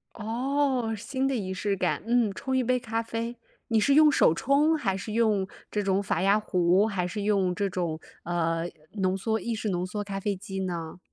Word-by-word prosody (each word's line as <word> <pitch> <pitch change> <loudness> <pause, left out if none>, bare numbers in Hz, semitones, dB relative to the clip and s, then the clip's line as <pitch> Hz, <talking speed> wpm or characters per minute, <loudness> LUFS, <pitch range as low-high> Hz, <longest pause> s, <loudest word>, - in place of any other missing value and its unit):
哦， 250 +1 0
新 260 +5 -2
的 275 - 0
仪 195 -6 -2
式 200 +1 -1
感。 - - 0
嗯， 235 -3 +2
冲 265 +6 -2
1 260 - +3
杯 250 +1 +2
咖 230 -1 -2
啡。 230 +1 -4 0.3
你 225 - +4
是 220 +6 +3
用 305 +1 +7
手 270 - +4
冲 285 - +3
还 195 -9 0
是 205 +3 -6
用 215 -4 +2 0.2
这 210 - -1
种 195 0 +1
法 185 -3 -1
压 200 +2 +4
壶， 185 0 +3
还 195 -5 -1
是 205 +4 -4
用 195 -3 +2
这 200 +1 0
种， 175 -4 -3 0.2
呃， 165 -1 0 0.3
浓 190 -2 0
缩 220 +3 -1
意 235 +1 -3
式 220 0 -3
浓 180 -2 -1
缩 205 +3 -4
咖 200 -1 -4
啡 200 +1 -1
机 195 0 -6
呢？ 170 -3 -4
205 Hz, 215 characters per minute, -27 LUFS, 185-230 Hz, 0.3 s, 用